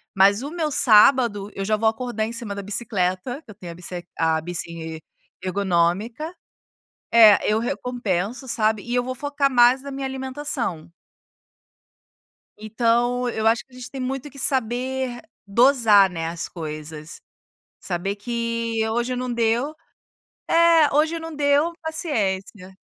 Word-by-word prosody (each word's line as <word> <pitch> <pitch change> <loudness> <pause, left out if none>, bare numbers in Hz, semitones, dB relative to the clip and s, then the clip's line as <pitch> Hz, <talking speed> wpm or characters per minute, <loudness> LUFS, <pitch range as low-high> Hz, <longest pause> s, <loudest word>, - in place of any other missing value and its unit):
mas 200 +4 +4
o 285 - -5
meu 325 -2 -2
sábado 215 -3 +4
eu 195 - -3
já 215 +1 +1
vou 220 +1 +1
acordar 225 -1 -3
em 225 - -6
cima 230 -3 -5
da 200 - -5
bicicleta, 200 - -2
que 225 - -13
eu - - -14
tenho 180 -4 -9
a - - -10
bici 175 0 -7
a 160 -1 +2
bici 165 -1 -5 0.4
ergonômica. 195 - 0 0.8
É, 220 -3 +7
eu 215 +1 +2
recompenso, 240 0 -3
sabe. 215 -2 +1
E 240 - -7
eu 245 0 +1
vou 255 - -4
focar 285 +1 0
mais 245 +1 +5
na 280 - -7
minha 270 0 -4
alimentação. 265 - -4 1.7
Então, 240 +3 +1
eu 220 -1 -3
acho 230 +2 +3
que 265 - -37
a - - -16
gente 250 - -9
tem 270 -1 -6
muito 270 +2 -4
que 275 - -9
saber 255 0 -1 0.2
dosar, 220 -3 +5
né, 165 -2 -4
as 165 0 -5
coisas. 155 -1 -8 0.6
Saber 195 +2 -3
que 230 +1 -3
hoje 240 +2 -1
não 250 0 -3
deu. 235 +5 0 0.7
É, 330 -3 +5
hoje 315 +3 +2
não 325 -1 -7
deu, 290 +3 +2
paciência. 200 - -3
230 Hz, 145 wpm, -23 LUFS, 195-260 Hz, 1.7 s, É